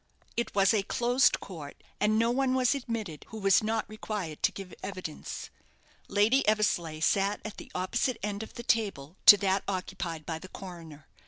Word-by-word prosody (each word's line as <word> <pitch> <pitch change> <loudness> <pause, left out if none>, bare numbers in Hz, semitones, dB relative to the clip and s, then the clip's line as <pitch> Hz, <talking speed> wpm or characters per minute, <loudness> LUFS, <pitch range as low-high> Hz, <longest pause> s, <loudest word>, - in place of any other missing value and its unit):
It 235 - -2
was 195 +2 +5
a 215 - +3
closed 245 +5 +2
court, 155 -7 -9 0.2
and 215 +1 +3
no 230 +1 +3
one 260 +1 +1
was 255 -2 +3
admitted 230 - -4
who 220 - -7
was 195 -2 +4
not 220 0 -1
required 210 -7 -5
to - - +3
give 195 -2 -9
evidence. 185 -6 -6 0.6
Lady 210 +7 +3
Eversleigh 175 -7 +1
sat 200 +3 +2
at 215 - -6
the - - -10
opposite 185 +7 0
end 205 0 -2
of 220 - -9
the 235 - -6
table 195 - -1
to 205 - +12
that 195 -1 +1
occupied 180 -4 -4
by 160 -2 -4
the 185 - -11
coroner. 165 -7 -10
200 Hz, 175 wpm, -29 LUFS, 180-220 Hz, 0.6 s, to